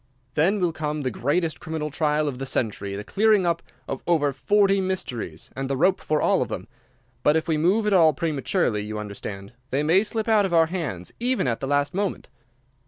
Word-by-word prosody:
Then 185 +9 +2
will 175 -2 +1
come 150 -1 -3
the 130 -2 -1
greatest 155 +7 -1
criminal 155 -1 -4
trial 150 0 +1
of 130 -3 -4
the 135 - -4
century, 105 -6 -2
the 100 - -5
clearing 210 - +3
up 170 -1 +1 0.3
of 135 - -4
over 150 -5 +2
forty 195 +7 +3
mysteries, 125 - -4
and 135 0 -3
the 135 - 0
rope 185 +7 +3
for 155 -1 0
all - - +2
of - - 0
them; - - -5 0.5
but 150 - +3
if 160 - 0
we 160 - +2
move 185 +8 +2
at 210 - +2
all 165 -4 +6
prematurely, 135 -7 -1
you 105 +1 -5
understand, 100 0 -7 0.2
they 135 +3 0
may 170 +6 +4
slip 220 +1 -3
out 215 -2 +4
of 185 -3 0
our 165 -1 +6
hands 155 - -4
even 245 - +1
at 115 -2 -1
the 135 - -4
last 145 0 +1
moment. 195 +1 -2
155 Hz, 210 wpm, -24 LUFS, 135-185 Hz, 0.5 s, all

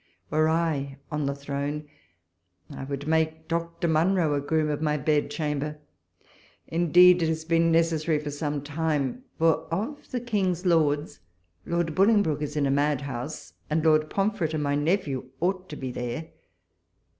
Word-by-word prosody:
Were 155 +1 +3
I 155 -4 0
on 150 -2 -1
the 140 - -1
throne, 145 +1 -4 0.8
I - - -7
would 140 0 -5
make 160 0 0
Dr. 170 0 -2
Monro 165 0 +2
a 145 - 0
Groom 155 +2 +1
of 150 0 -2
my 150 -1 +1
Bedchamber: 150 0 -1 0.9
indeed 175 +2 +5
it 165 - +2
has 160 0 -2
been 165 0 +3
necessary 165 -1 +2
for 150 0 -4
some 145 -1 -3
time; 155 - -2
for, 165 -1 +2
of 225 - -3
the 250 - -2
King's 195 -6 -1
lords. 155 - +2 0.5
Lord 170 -2 0
Bolingbroke 195 -6 +3
is 150 0 -3
in 145 - +2
a 135 - +1
mad 145 0 +1
house, 120 -9 -6 0.2
and 155 +1 0
Lord 155 -1 +4
Pom 200 +2 +1
fret 165 -7 -2
and 150 - -1
my 145 0 0
nephew 145 -4 0
ought 185 +1 -1
to 150 - -6
be 130 -3 -5
there. 125 +7 -4
155 Hz, 160 wpm, -26 LUFS, 145-170 Hz, 0.9 s, indeed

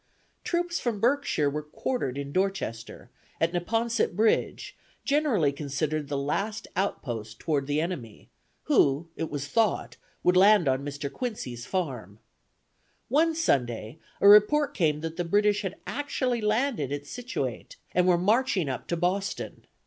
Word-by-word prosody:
"Troops 345 0 -1
from 230 -4 -2
Berkshire 245 - +2
were 150 +2 -1
quartered 150 - -3
in 140 0 -5
Dorchester, 160 - -3 0.3
at 165 +1 +1
Neponset 225 +4 0
Bridge, 220 +2 +1 0.3
generally 275 - +2
considered 145 +1 -2
the 145 0 -2
last 200 +11 -2
outpost 115 - -3
toward 145 -4 -1
the 145 +1 +1
enemy, 155 - -5 0.4
who, 145 +4 +2
it 160 - -3
was 145 -1 -4
thought, 220 +4 0 0.3
would 180 - +4
land 195 -2 +6
on 130 +1 +1
Mr. 145 0 -5
Quincy's 130 - -5
farm. 125 - -3 0.9
One 320 +5 +3
Sunday, 125 - 0 0.2
a - - +5
report 210 +8 +6
came 150 -4 +1
that 165 0 -5
the 175 - 0
British 205 +4 +2
had 190 -1 -4
actually 255 -4 -1
landed 215 - 0
at 145 0 -4
Scituate, 245 - -5 0.2
and 180 0 +3
were 180 -1 +5
marching 200 - +2
up 130 - -5
to 170 - -1
Boston. 190 +4 -2
175 Hz, 140 wpm, -27 LUFS, 140-220 Hz, 0.9 s, land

